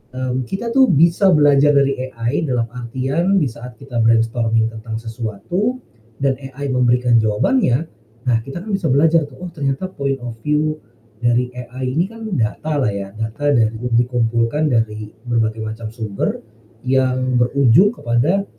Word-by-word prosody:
mmm, 130 -1 -2
kita 230 - -3
tuh 265 +1 +5
bisa 170 +3 +4
belajar 145 -1 +5
dari 140 -1 +3 0.2
AI 120 +7 -1
dalam 120 -3 -1
artian 130 +10 -1
di 145 - +2
saat 125 0 -10
kita 135 -3 -6
brainstorming 115 0 +2
tentang 110 0 -7
sesuatu 120 - -3 0.4
dan 135 -1 +1
AI 135 +1 -6
memberikan 125 -1 +3
jawabannya, 125 - +1 0.3
nah 120 -3 +2
kita 140 +6 -7
kan 215 - -6
bisa 195 -4 0
belajar 155 +4 +3
tuh, 135 - -15
oh 175 - -6
ternyata 140 +5 -3
point 140 -3 -2
of 115 -2 -6
view 155 +1 0 0.4
dari 120 +1 +1
AI 125 +1 -5
ini 175 +3 +2
kan 225 +1 -11
data 145 +7 -1
lah 130 - +1
ya, 100 -1 -5
data 110 +7 -2
dari 115 -3 +2
yang 120 +1 -2
dikumpulkan 120 +4 +1
dari 110 -2 -1 0.2
berbagai 110 -2 0
macam 110 0 -5
sumber 110 -3 -3 0.5
yang 130 -1 +1
berujung 140 - +4
kepada, 165 - 0
125 Hz, 155 wpm, -19 LUFS, 115-150 Hz, 0.5 s, tuh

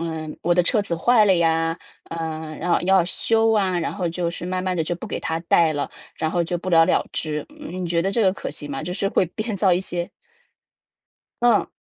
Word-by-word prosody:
呃， 160 -1 -4
我 175 0 +2
的 180 - +4
车 210 +5 +2
子 170 -4 -2
坏 220 +3 +4
了 190 - +5
呀， 165 0 +1 0.3
呃， 160 -1 -5
然 175 +2 -2
后 - - +3
要 190 -1 +4
修 225 +4 +2
啊， 190 -4 +2
然 165 - -2
后 180 -4 -2
就 170 0 -2
是 170 +1 -6
慢 185 0 -2
慢 185 -1 0
地 165 - 0
就 175 +2 -2
不 170 - -8
给 - - -4
他 160 0 -2
带 165 -2 +3
了， 145 - -2 0.3
然 160 - -1
后 175 - +1
就 175 +1 -2
不 185 +2 -5
了 165 -1 +6
了 - - +2
之。 150 -1 -3
嗯， 185 -11 -5
你 - - -2
觉 170 0 +1
得 195 +3 0
这 225 +2 +1
个 190 - +4
可 - - -6
行 145 -1 -8
吗？ 135 - -4
就 175 - -5
是 195 0 -1
会 185 - +2
编 215 +5 -4
造 190 -1 +2
一 175 - +4
些 175 -2 -4 1.3
嗯。 235 -3 +4
175 Hz, 260 characters per minute, -23 LUFS, 165-190 Hz, 1.3 s, 了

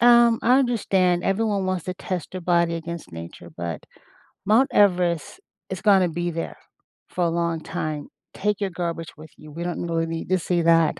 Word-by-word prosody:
Um, 235 -1 +6
I 250 +3 +5
understand 190 -8 +2
everyone 200 -1 +1
wants 185 -3 -1
to 185 0 -4
test 180 -2 -4
your 185 - -5
body 170 -1 +2
against 165 - -6
nature, 85 +1 -9
but 85 -1 -5 0.6
Mount 230 +7 +4
Everest 180 -5 +2 0.3
is 190 0 -5
gonna 190 -4 +5
be 175 +1 -2
there 165 0 -5 0.5
for 180 - -1
a - - +2
long 170 -1 -1
time. 150 -2 -4 0.3
Take 210 0 -1
your 200 - 0
garbage 170 -2 -4
with 155 +1 -12
you. 155 0 -13
We 170 +3 -5
don't 175 0 -3
really 165 -1 0
need 165 +1 -5
to 185 0 +3
see 175 0 0
that. 165 -1 +4
175 Hz, 185 wpm, -24 LUFS, 165-195 Hz, 0.6 s, Um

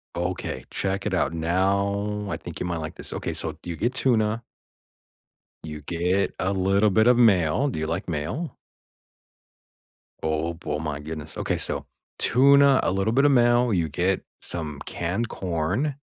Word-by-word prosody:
Okay, 90 -7 -3
check 95 +1 -2
it 95 - 0
out, 90 - +1
now, 100 +5 0
I - - -2
think - - -9
you - - -2
might 85 -1 -2
like 80 -1 -5
this, - - -8
okay - - -3
so, 80 -2 -3
you 85 -2 -4
get 120 +9 -1
tuna 115 -3 +2 1.2
You 75 -1 -6
get 90 +5 0
a 95 - +1
little 100 +2 +3
bit 110 +3 +3
of 125 -1 +6
mayo. 105 - +4
Do 105 - -4
you 80 - -2
like 90 +4 -3
mayo? 90 - -3 1.7
Oh, 80 +1 -1
bo 80 -3 -5
oh, - - -2
my 75 -2 -3
goodness, 75 0 -7
okay, - - -1
so, - - -1 0.3
tuna, 140 +2 +5
a - - +1
little 95 +4 0
bit 140 +3 +4
of 145 - +6
mayo, 120 -1 +4
you 85 -5 +1
get 90 +5 0 0.2
some 75 -4 -4
canned 95 +7 -2
corn. 95 - -1
95 Hz, 170 wpm, -25 LUFS, 80-110 Hz, 1.7 s, of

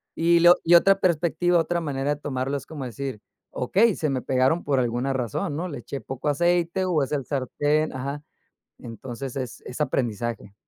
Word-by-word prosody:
Y 170 +1 +3
lo 175 +1 +8
y 175 - +7
otra 195 +3 +5
perspectiva, 175 0 +2
otra 170 +1 0
manera 145 -2 -1
de - - -16
tomarlo, 135 -1 -2
es 135 - -9
como 150 -4 -7
decir: 130 -2 -5 0.3
"Okey, 200 - +2
se 155 - -1
me 130 -2 -1
pegaron 130 +6 +1
por 140 -2 +2
alguna 125 +2 0
razón, 130 - -2
¿no? 175 +4 -3
Le 145 - -6
eché 135 +1 -7
poco 135 +5 -6
aceite, 175 +4 +1
o, 175 -5 +1
es 145 - -4
el 140 -3 -1
sartén", 145 +3 0
ajá, 140 +3 -4 0.6
entonces, 120 +3 -7
es 130 -3 -5
es 125 - -7
aprendizaje. 120 -6 -2
140 Hz, 185 wpm, -25 LUFS, 130-170 Hz, 0.6 s, lo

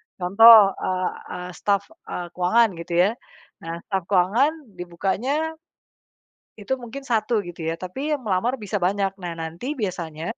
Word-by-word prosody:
contoh, 200 +2 +8
eee, 185 0 -1 0.2
ah, 180 0 -7
staf, 200 +2 0 0.2
e - - -5 0.2
keuangan 220 +7 +3
gitu 170 +1 -6
ya. 200 - +2 0.5
Nah 165 +1 -7
staf 195 -3 -2
keuangan 205 - +3 0.3
dibukanya 250 - -2 1.0
itu 205 - -4
mungkin 240 +4 -7
1 220 +1 0
gitu 175 -1 -9
ya, 165 - -1
tapi 265 +12 -4
yang 290 - -1
melamar 205 +6 +1
bisa 205 0 -3
banyak. 195 +1 0
Nah 175 -1 -4
nanti 170 - -5
biasanya, 175 - -4
195 Hz, 145 wpm, -23 LUFS, 180-230 Hz, 1.0 s, contoh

